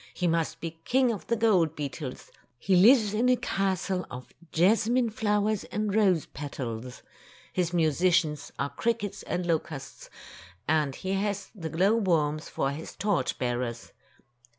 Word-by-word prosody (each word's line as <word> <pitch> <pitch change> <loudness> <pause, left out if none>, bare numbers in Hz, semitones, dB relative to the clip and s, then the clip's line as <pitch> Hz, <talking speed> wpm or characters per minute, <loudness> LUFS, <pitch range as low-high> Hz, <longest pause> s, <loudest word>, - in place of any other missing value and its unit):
"He 180 - -1
must 165 -1 0
be 165 -1 -6
King 255 -1 +3
of 210 - -6
the 235 - +2
gold 190 -9 +3
beetles. 140 -2 -6 0.3
He 185 +10 +1
lives 215 +2 +6
in 235 +4 +2
a 250 - +5
castle 190 -4 -1
of 125 0 -9 0.2
jasmine 225 +7 +3
flowers 210 -1 0
and 210 -1 -2
rose 195 -7 +3
petals. 125 -4 -6 0.5
His 180 -2 +1
musi 170 0 +2
cians 160 -5 +1
are 140 0 -2
crickets 205 +2 -2
and 180 - -3
locusts, 155 -5 -3 0.6
and 150 -3 +1
he 190 - -4
has 200 0 -2
the 170 -7 -6
glow 185 +7 +3
worms 160 -8 +1
for 135 - -1
his 155 +3 -7
torch 190 -10 0
bearers." 120 -1 -3
180 Hz, 150 wpm, -28 LUFS, 150-210 Hz, 0.6 s, lives